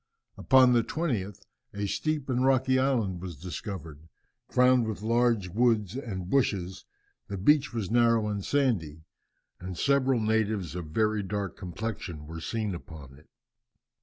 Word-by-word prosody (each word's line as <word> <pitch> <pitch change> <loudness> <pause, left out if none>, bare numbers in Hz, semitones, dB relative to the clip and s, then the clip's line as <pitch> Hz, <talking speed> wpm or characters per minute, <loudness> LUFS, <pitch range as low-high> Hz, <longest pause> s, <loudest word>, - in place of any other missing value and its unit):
Upon 130 -1 +5
the 120 - +4
20th 105 - -3 0.3
a 100 0 -2
steep 150 +7 -2
and 130 -1 0
rocky 130 0 +3
island 115 -10 0
was 90 -3 -6
discovered, 80 -2 -7 0.4
crowned 125 -2 +4
with 105 -2 -5
large 115 -4 +2
woods, 110 0 +1
and 100 -9 -5
bushes; 95 -6 0 0.4
the 100 - -5
beach 145 +9 +3
was 110 -5 -3
narrow 115 -2 +3
and 100 -2 -3
sandy, 95 - 0 0.6
and 90 0 -7
several 135 -2 +2
natives 110 -5 0
of 85 -3 -5
very 110 +6 +1
dark 100 -2 -4
complexion 90 -4 -6
were 80 +2 -8
seen 110 +1 -2
upon 80 -6 -10
it. 75 +3 -19
105 Hz, 140 wpm, -28 LUFS, 90-125 Hz, 0.6 s, Upon